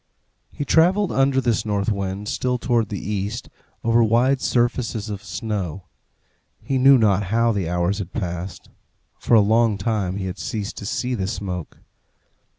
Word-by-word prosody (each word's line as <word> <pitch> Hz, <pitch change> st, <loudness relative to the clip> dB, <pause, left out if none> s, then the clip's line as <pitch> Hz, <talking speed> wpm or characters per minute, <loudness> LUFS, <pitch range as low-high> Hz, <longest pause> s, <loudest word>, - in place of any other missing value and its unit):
He 145 Hz, -, -4 dB
travelled 180 Hz, +6 st, +3 dB
under 135 Hz, 0 st, +2 dB
this 120 Hz, -4 st, +1 dB
north 105 Hz, -1 st, 0 dB
wind, 100 Hz, 0 st, -3 dB
still 125 Hz, +3 st, -1 dB
towards 115 Hz, -3 st, 0 dB
the 100 Hz, -, -3 dB
east, 105 Hz, +4 st, -4 dB, 0.3 s
over 115 Hz, 0 st, +4 dB
wide 125 Hz, +4 st, +3 dB
surfaces 120 Hz, -3 st, 0 dB
of 100 Hz, -1 st, -6 dB
snow. 100 Hz, -6 st, -4 dB, 0.8 s
He 135 Hz, -1 st, -1 dB
knew 135 Hz, +1 st, +7 dB
not 105 Hz, -4 st, +2 dB
how 115 Hz, +4 st, +2 dB
the 95 Hz, -6 st, -2 dB
hours 90 Hz, +3 st, 0 dB
had 95 Hz, -3 st, -5 dB
passed. 90 Hz, -2 st, -5 dB, 0.5 s
For 120 Hz, -, +3 dB
a 110 Hz, -, +7 dB
long 110 Hz, +1 st, +3 dB
time 100 Hz, -2 st, -1 dB
he 95 Hz, -, -3 dB
had 95 Hz, 0 st, -5 dB
ceased 105 Hz, -3 st, -4 dB
to 100 Hz, -, -6 dB
see 125 Hz, +4 st, -2 dB
the 95 Hz, -6 st, -2 dB
smoke. 95 Hz, -5 st, -5 dB
105 Hz, 160 wpm, -22 LUFS, 100-120 Hz, 0.8 s, knew